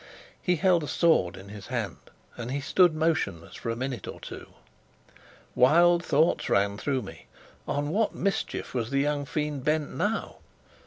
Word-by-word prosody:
He 180 - +2
held 175 0 +3
a - - -4
sword 120 - +2
in 95 +1 -11
his 105 -1 -9
hand, 115 -7 -3 0.4
and 120 0 -6
he 140 +2 -1
stood 165 +3 +3
motionless 155 - -1
for - - -5
a 115 - -1
minute 125 -3 -4
or - - -7
two. - - -9 1.1
Wild 170 +6 +5
thoughts 155 +2 +2
ran 100 0 +2
through 135 -4 -1
me. 80 -10 -11 0.4
On 145 +1 -1
what 210 +6 0
mischief 195 0 -2
was 120 -2 -2
the 140 0 +1
young 145 0 0
fiend 150 -2 -3
bent 150 0 0
now? 220 +2 -2
145 Hz, 165 wpm, -27 LUFS, 115-165 Hz, 1.1 s, Wild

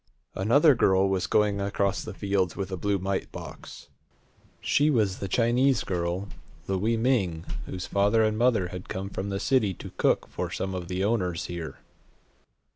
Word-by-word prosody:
Another 140 - +5
girl 95 -5 +3
was 95 -1 0
going 105 -1 +2
across 100 0 0
the - - -7
fields 100 -4 0
with 95 -1 -4
a - - -1
blue 100 +3 0
mite 95 +1 -2
box. - - -10 0.7
She 145 +2 +2
was 105 -9 +1
the 100 - -3
Chinese 125 +6 +2
girl, 90 +2 -2 0.4
Louie 105 +4 0
Ming, 100 -10 +1 0.2
whose 90 0 -5
father 105 +3 +2
and 110 0 +1
mother 110 -6 +2
had 90 0 -8
come 95 +1 -4
from 100 +1 -4
the 100 0 -2
city 110 -8 +2
to - - -9
cook - - +2
for - - -4
some 95 0 -3
of 90 -2 -4
the 90 +1 -2
owners 95 -6 0
here. 85 -5 -6
100 Hz, 170 wpm, -27 LUFS, 95-110 Hz, 0.7 s, Another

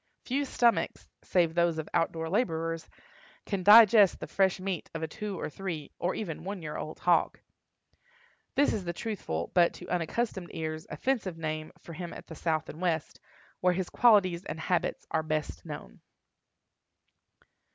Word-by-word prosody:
Few 275 +3 0
stomachs, 240 -3 +1 0.2
save 170 -3 +2
those 170 -1 +2
of 155 - -4
out 165 - +2
door 165 0 -4
laborers, 165 -4 -1 0.6
can 200 -3 -2
digest 210 0 +8
the - - -5
fresh 190 -1 +1
meat 185 -3 -3
of 165 - -3
a - - -1
two 210 +3 -5
or - - -2
three, 160 -3 -5
or 180 - 0
even 165 -8 -5
one 195 -1 -5
year 150 -1 -5
old 155 - -5
hog. 175 -1 +2 1.2
This 285 - +3
is 205 - -2
the 170 -1 -3
truthful, 170 - -4
but, 175 -1 +4
to 180 - -10
unaccustomed 180 +2 -2
ears, 155 -1 -4
offensive 225 -10 -1
name 155 -1 -4
for 170 - -11
him 175 +1 -6
at - - -10
the - - -10
South 160 -1 -1
and 155 - -9
West, 165 -4 -1 0.4
where 180 0 +3
his 185 0 -3
qualities 195 -7 +4
and 160 - -6
habits 175 +2 -1
are 160 - +2
best 155 -1 -3
known. - - -8
175 Hz, 165 wpm, -29 LUFS, 160-195 Hz, 1.2 s, digest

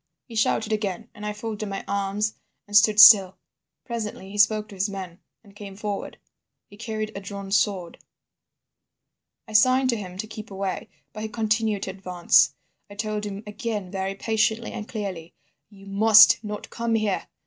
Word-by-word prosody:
"He 235 - -13
shouted 220 0 +1
again, 210 +1 -3
and 210 - -12
I - - -2
folded 210 0 -5
my 195 - -5
arms 200 +2 -1 0.3
and 205 - -7
stood 215 0 +5
still. 195 -3 +9 0.5
Presently 215 -4 -6
he 205 - -7
spoke 215 +1 +3
to 200 - -11
his 195 +2 -1
men 185 -3 -8 0.2
and 200 -2 -19
came 200 -2 -10
forward. 205 0 -5 0.5
He 205 - -17
carried 215 0 -5
a - - -4
drawn 200 0 -8
sword. 195 -4 0 1.5
"I 215 - -11
signed 255 +4 +4
to 235 - -1
him 185 -3 -8
to 200 - -4
keep 215 0 -10
away, 195 -1 -4 0.2
but 215 - -7
he 220 - -4
continued 215 -1 -1
to 190 - -4
advance. 175 -6 +2 0.3
I 205 - -11
told 210 0 -3
him 200 +1 -7
again 210 -3 -5
very 195 0 -3
patiently 220 +2 0
and 215 - -7
clearly: 190 -7 -6 0.3
'You 195 -2 -16
must 215 +2 +6
not 210 -1 -7
come 230 -1 -1
here. 215 -3 -1
210 Hz, 170 wpm, -24 LUFS, 195-220 Hz, 1.5 s, still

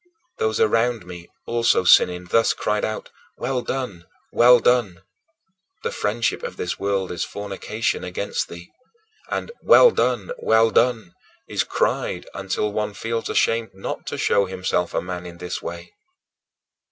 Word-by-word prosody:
Those 110 0 0
around 115 -1 +2
me, 90 -1 -10 0.2
also 115 -4 +2
sinning, 90 0 +5
thus 115 0 +4
cried 105 0 -1
out: 110 - -4 0.3
"Well 125 0 -1
done! 120 -11 -5 0.2
Well 120 +1 +7
done!" 105 -8 +1 0.8
The - - -1
friendship 110 +3 -1
of - - -6
this 90 - -3
world 100 -1 -1
is 85 - -2
fornication 105 +2 -3
against 90 +3 -3
thee; 85 +1 -11 0.6
and - - -3
"Well - - +7
done! 485 - 0
Well 110 0 +3
done!" 115 -7 +1 0.3
is - - 0
cried - - -1
until 100 +2 -2
one 105 -1 -2
feels 115 +2 -3
ashamed 115 -3 +1
not 95 - -6
to - - -4
show 100 - +2
himself 90 -1 -2
a - - 0
man 90 -1 -6
in 85 -1 -10
this 90 0 -5
way. 85 +1 -8
105 Hz, 145 wpm, -22 LUFS, 90-115 Hz, 0.8 s, Well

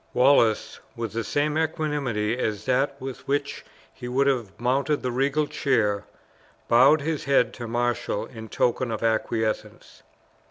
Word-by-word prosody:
Wallace, 125 -4 +3 0.2
with 115 -3 -4
the 115 0 -2
same 150 +7 0
equanimity 145 -9 -1
as 110 -4 -3
that 135 +2 +1
with 130 -1 -8
which 140 0 -2 0.3
he 125 - -8
would 130 +3 +1
have 120 -8 -1
mounted 135 +4 0
the 125 - -1
regal 140 +4 +1
chair, 110 -9 0 0.6
bowed 130 +6 +5
his 155 0 -3
head 140 -3 +3
to 120 -2 -7
marshal 120 +1 -1
in 110 -2 -10
token 125 +2 0
of 110 0 -4
acquiescence. 110 -1 -2
125 Hz, 145 wpm, -25 LUFS, 115-140 Hz, 0.6 s, bowed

